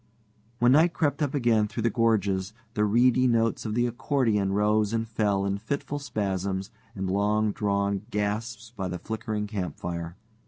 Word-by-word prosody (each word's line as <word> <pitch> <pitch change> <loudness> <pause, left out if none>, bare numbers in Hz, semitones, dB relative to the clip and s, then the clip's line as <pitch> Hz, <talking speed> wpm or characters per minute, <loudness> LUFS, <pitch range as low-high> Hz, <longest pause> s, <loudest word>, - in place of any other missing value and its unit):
When 120 +1 +4
night 160 +5 +5
crept 145 -3 0
up 145 -1 0
again 115 -5 +3
through 115 +1 -4
the 115 - +2
gorges, 100 -4 +1 0.2
the 105 - +2
reedy 125 +4 +4
notes 115 -1 +1
of 105 - -2
the 120 0 +2
accordion 120 -5 0
rose 105 +1 +2
and 115 0 -1
fell 105 -3 0
in 100 0 -1
fitful 140 +5 -3
spasms 95 -6 -2 0.2
and 95 -1 -3
long 105 +2 +1
drawn 100 -2 0
gasps 110 +2 -3
by 95 -3 -3
the 90 0 -4
flickering 110 +2 -3
campfire. 85 -4 -4
105 Hz, 160 wpm, -27 LUFS, 100-120 Hz, 0.2 s, night